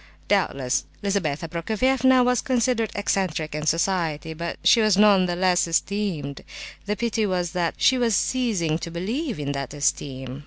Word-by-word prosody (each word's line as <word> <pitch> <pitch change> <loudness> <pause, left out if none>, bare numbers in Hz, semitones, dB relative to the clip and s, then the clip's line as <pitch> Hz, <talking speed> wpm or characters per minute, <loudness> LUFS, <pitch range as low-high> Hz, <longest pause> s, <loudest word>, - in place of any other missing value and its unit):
Doubtless 130 -1 0 0.2
Lizabetha 170 -6 -1
Prokofievna 250 +9 +2
was 250 -1 +2
considered 240 -3 0
"eccentric" 185 -6 -1
in 150 0 -4
society, 165 -2 0
but 170 +2 -5
she 230 - +5
was 215 -3 +3
none 200 -3 +5
the 175 - -2
less 180 -1 +2
esteemed: 165 -5 -2 0.4
the 210 - 0
pity 225 0 -1
was 180 -3 -1
that 175 -2 -1
she 260 -1 +3
was 230 -4 +2
ceasing 190 -11 0
to 170 - -6
believe 220 - -3
in 145 -1 -3
that 140 0 -5
esteem. 135 -2 -2
185 Hz, 155 wpm, -24 LUFS, 155-220 Hz, 0.4 s, she